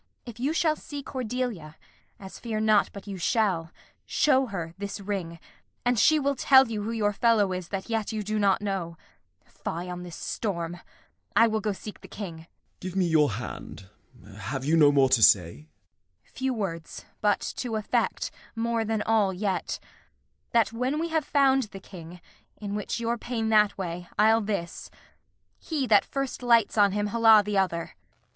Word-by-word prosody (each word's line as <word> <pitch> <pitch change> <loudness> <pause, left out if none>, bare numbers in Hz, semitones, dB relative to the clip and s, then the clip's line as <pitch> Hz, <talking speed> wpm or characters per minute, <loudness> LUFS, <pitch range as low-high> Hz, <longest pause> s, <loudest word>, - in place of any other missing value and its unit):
If 235 -2 -10
you 270 +5 0
shall 320 -1 +2
see 290 -2 -8
Cordelia 245 - -4 0.4
(As 190 -1 -10
fear 225 -3 -3
not 215 -1 +3
but 200 - -10
you 200 -2 -6
shall), 175 -4 0 0.4
show 270 -3 +3
her 170 -6 -5
this 200 0 -5
ring, 190 -4 -4 0.5
And 245 -2 +2
she 310 +8 +5
will 280 0 0
tell 265 -1 +6
you 215 -2 -3
who 210 - -4
your 215 -3 0
fellow 210 -2 +3
is 180 -2 -5
That 195 0 -5
yet 225 -2 -2
you 215 -1 -3
do 215 +1 -2
not 200 0 +2
know. 185 -5 -3 0.5
Fie 175 +2 -6
on 180 0 -6
this 175 -2 -8
storm! 175 -5 -4 0.6
I 230 - +7
will 220 -1 0
go 210 0 -1
seek 205 +2 -9
the - - -12
King. 185 -6 -7
Gent. 160 +1 -14 0.3
Give 185 0 -6
me 190 -2 +2
your 150 -7 +3
hand. 105 -3 -8 0.5
Have 130 +4 -4
you 155 +3 +3
no 150 -3 +6
more 140 -2 +4
to 130 -3 +3
say? 85 -8 +4 0.6
Kent. - - -30
Few 265 0 -1
words, 165 -7 -5 0.2
but, 205 -1 +2 0.2
to 240 -3 -3
effect, 215 -1 -1 0.2
more 230 0 0
than 220 -1 -1
all 215 -3 +2
yet: 190 0 -2 0.7
That, 230 -1 +2
when 250 +5 -1
we 335 +2 -2
have 320 -3 0
found 270 -3 +3
the 195 -2 -10
King 180 -2 -11 0.4
(in 205 -1 -5
which 210 +2 -3
your 235 0 -1
pain 225 -2 -2
That 210 -2 +4
way, 175 -2 -5
I'll 220 +2 +5
this), 200 -5 -4 0.7
he 300 -5 -2
that 215 -4 +4
first 275 -2 -4
lights 235 -3 +3
on 205 -2 +5
him 205 +1 -1
Holla 220 0 +6
the 205 -1 +1
other. 170 -3 -1
210 Hz, 180 wpm, -27 LUFS, 180-230 Hz, 0.7 s, I